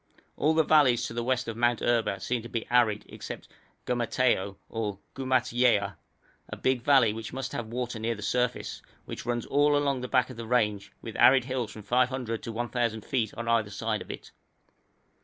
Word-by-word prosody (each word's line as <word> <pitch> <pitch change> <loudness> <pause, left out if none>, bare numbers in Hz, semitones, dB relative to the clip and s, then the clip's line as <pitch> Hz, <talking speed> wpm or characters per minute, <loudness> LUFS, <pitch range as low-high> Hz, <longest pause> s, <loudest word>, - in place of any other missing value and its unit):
All 155 +2 +2
the 160 - +5
valleys 145 -6 +4
to - - -5
the 120 0 -2
west 125 0 0
of 115 - -4
Mount 120 0 +2
Erba 115 -5 +1
seem 120 +5 -2
to 115 - -9
be 115 - -3
arid 115 -4 +3
except - - -8 0.4
Gumateo 120 -4 +1
or 105 -3 -3 0.2
Gumatyewa, 125 -5 +2 0.5
a - - -6
big 130 -2 +1
valley 130 -5 +5
which 110 0 -7
must 135 0 -4
have 115 - -4
water 120 0 -4
near 115 +1 -1
the 105 - -8
surface, 125 +3 -1 0.2
which - - -7
runs 120 -1 -1
all 145 +1 +3
along 140 -2 +1
at - - -6
the 125 - -4
back 125 0 +2
of 125 - -11
the 115 -1 -6
range, 105 -5 +1
with - - -7
arid 130 -1 +6
hills 130 -4 -2
from 110 - -10
500 125 0 0
to 115 - -5
1,000 115 -1 -2
feet 115 -5 0
on 115 0 -5
either 115 -3 +2
side 110 +1 -2
of - - -10
it. - - -8
120 Hz, 195 wpm, -28 LUFS, 110-130 Hz, 0.5 s, arid